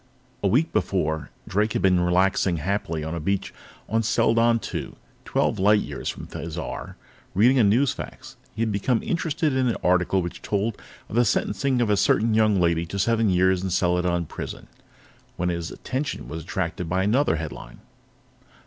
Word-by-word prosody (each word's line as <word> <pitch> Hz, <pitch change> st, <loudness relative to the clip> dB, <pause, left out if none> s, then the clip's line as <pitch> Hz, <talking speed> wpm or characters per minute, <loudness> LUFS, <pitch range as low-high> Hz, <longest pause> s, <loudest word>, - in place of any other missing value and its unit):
A 100 Hz, -, +2 dB
week 135 Hz, -, +2 dB
before, 80 Hz, -6 st, -1 dB, 0.2 s
Drake 105 Hz, +2 st, 0 dB
had -, -, -1 dB
been 90 Hz, -2 st, +4 dB
relaxing 90 Hz, 0 st, +2 dB
happily 80 Hz, -2 st, -2 dB
on 80 Hz, +1 st, -4 dB
a 85 Hz, -, -3 dB
beach 95 Hz, +5 st, -2 dB, 0.3 s
on 115 Hz, +1 st, +1 dB
Seladon 115 Hz, +1 st, +3 dB
II, -, -, -4 dB, 0.3 s
twelve -, -, 0 dB
light 105 Hz, +2 st, +4 dB
years -, -, -5 dB
from -, -, -6 dB
Thizar, 80 Hz, -3 st, -6 dB, 0.4 s
reading 125 Hz, +7 st, +5 dB
a -, -, +5 dB
newsfax. 120 Hz, +7 st, 0 dB, 0.2 s
He 110 Hz, -, 0 dB
had 110 Hz, -, 0 dB
become 110 Hz, +4 st, 0 dB
interested 155 Hz, -4 st, 0 dB
in 130 Hz, -1 st, +2 dB
an 115 Hz, -, 0 dB
article 90 Hz, +1 st, +2 dB
which 85 Hz, -, -6 dB
told 105 Hz, +2 st, -1 dB, 0.3 s
of -, -, -11 dB
the 120 Hz, -, +5 dB
sentencing 120 Hz, +3 st, +1 dB
of 110 Hz, -3 st, +2 dB
a 105 Hz, -, +3 dB
certain 110 Hz, +3 st, +3 dB, 0.3 s
lady 85 Hz, -1 st, +1 dB
to 100 Hz, -, -5 dB
seven 115 Hz, +2 st, +2 dB
years 95 Hz, 0 st, +3 dB
in 95 Hz, -, -2 dB
Seladon 90 Hz, -1 st, +1 dB
Prison, -, -, -7 dB, 0.7 s
when 90 Hz, 0 st, 0 dB
his 85 Hz, -1 st, -3 dB
attention 130 Hz, +1 st, -4 dB
was 80 Hz, -, -6 dB
attracted 85 Hz, 0 st, -3 dB
by 95 Hz, +2 st, +1 dB
another 115 Hz, -, +2 dB
headline. 70 Hz, -6 st, -7 dB
95 Hz, 165 wpm, -24 LUFS, 90-115 Hz, 0.7 s, reading